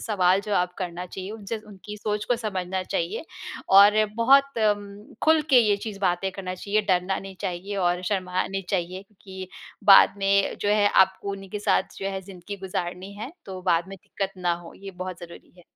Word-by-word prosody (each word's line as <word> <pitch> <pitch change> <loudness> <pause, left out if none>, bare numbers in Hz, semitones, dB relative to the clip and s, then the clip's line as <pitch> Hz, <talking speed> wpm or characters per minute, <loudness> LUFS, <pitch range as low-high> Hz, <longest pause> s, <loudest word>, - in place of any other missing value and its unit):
सवाल-जवाब 195 -2 +2
करना 180 -1 -4
चाहिए। 190 +2 -7
उनसे 220 0 -5
उनकी 210 +1 -10
सोच 210 0 -2
को 245 - +1
समझना 190 -4 -3
चाहिए, 185 - -3 0.4
और 205 +2 +7
बहुत 275 +2 +4
अम्म, 205 -1 -1
खुल 315 -1 +4
के 255 - +8
ये 210 -3 +3
चीज़ 200 -1 -7
बातें 190 0 +1
करना 185 -1 -5
चाहिए, 205 +3 0
डरना 185 +1 +1
नहीं 195 -1 -9
चाहिए 195 +1 -4
और 180 -1 +1
शर्माना 185 -1 -1
नहीं 195 0 -3
चाहिए 185 +1 -2 0.2
कि, 190 -2 -8 0.4
बाद 195 -1 +8
में 195 0 +2
जो 205 - 0
है 205 0 +4
आपको 190 +1 +3
उन्हीं 195 -1 -8
के 210 - -3
साथ 205 - 0
जो 195 - -2
है 190 0 -4
ज़िंदगी 190 +1 -9
गुज़ारनी 180 +2 -4
है, 225 +8 -7
तो 190 -1 -7
बाद 175 0 +1
में 195 - -8
दिक्कत 195 -1 -4
ना 175 -1 +1
हो। - - -11
ये 195 0 -9
बहुत 185 -1 -5
ज़रूरी 170 0 -12
है - - -15
195 Hz, 190 wpm, -25 LUFS, 185-205 Hz, 0.4 s, के